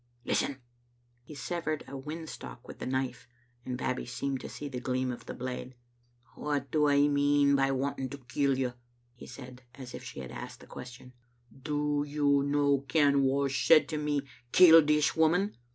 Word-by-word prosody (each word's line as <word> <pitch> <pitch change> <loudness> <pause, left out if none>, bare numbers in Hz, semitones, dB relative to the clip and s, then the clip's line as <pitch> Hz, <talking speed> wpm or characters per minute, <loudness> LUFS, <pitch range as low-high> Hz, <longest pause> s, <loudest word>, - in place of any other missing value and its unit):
Listen!" 135 -2 0 0.6
He 150 +5 -12
severed 155 +3 -3
a - - -11
whin 155 +4 -6
stalk 65 - -9
with - - -10
the - - -5
knife, 130 -2 -2 0.4
and 125 0 -4
Babbie 130 -1 -2
seemed 135 +2 -3
to - - -7
see 145 - -7
the 130 -3 -5
gleam 130 0 -1
of 120 - -9
the - - -6
blade. 125 0 -6 0.6
"What 140 -3 -3
do 150 -1 +3
I 145 0 +4
mean 145 0 +3
by 135 0 +2
wanting 135 0 -2
to 140 - -7
kill 135 +1 0
you?" 125 -2 -1 0.4
he 120 - -12
said, 125 0 -11
as 130 -2 -9
if - - -8
she - - -7
had 65 - -8
asked - - -8
the - - -14
question. 125 0 -11 0.3
" 120 0 -28 0.2
Do 145 0 0
you 145 -1 +2
no 140 0 +2
ken 140 +1 +3
wha 135 +1 +2
said 150 +3 +4
to 155 - -2
me, 150 -1 0 0.3
*Kill 165 -3 +9
this 150 0 +2
woman?' 175 +6 +2
140 Hz, 185 wpm, -30 LUFS, 130-145 Hz, 0.6 s, Kill